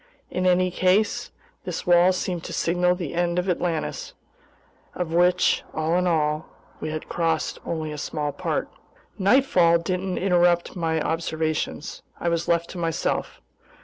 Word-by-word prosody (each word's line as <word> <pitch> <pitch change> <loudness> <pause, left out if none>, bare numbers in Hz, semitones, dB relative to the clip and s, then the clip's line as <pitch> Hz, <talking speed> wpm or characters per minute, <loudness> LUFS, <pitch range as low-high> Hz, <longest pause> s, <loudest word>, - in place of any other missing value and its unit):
In 185 0 0
any 180 0 +3
case 185 +4 +1 0.3
this - - -5
wall 175 0 +6
seemed 180 -2 -3
to - - -6
signal 180 +1 +2
the 175 -5 -5
end 175 0 0
of 180 +1 0
Atlantis, 175 -3 -2 0.8
of 175 -2 -3
which, 180 +1 +3
all 160 +2 0
in 180 0 +2
all, 155 -2 0 0.3
we 155 - -4
had 155 0 -5
crossed 165 -1 -1
only 155 -2 -3
a 150 - -6
small 150 0 -2
part. - - -2 0.5
Nightfall 190 -6 +4
didn't 185 +2 -2
interrupt 175 -2 +2
my 165 -2 0
observations. 160 -1 -2 0.2
I 170 - 0
was 170 0 -1
left 170 0 +1
to 180 - -7
myself. 165 -2 -2
175 Hz, 145 wpm, -24 LUFS, 160-180 Hz, 0.8 s, wall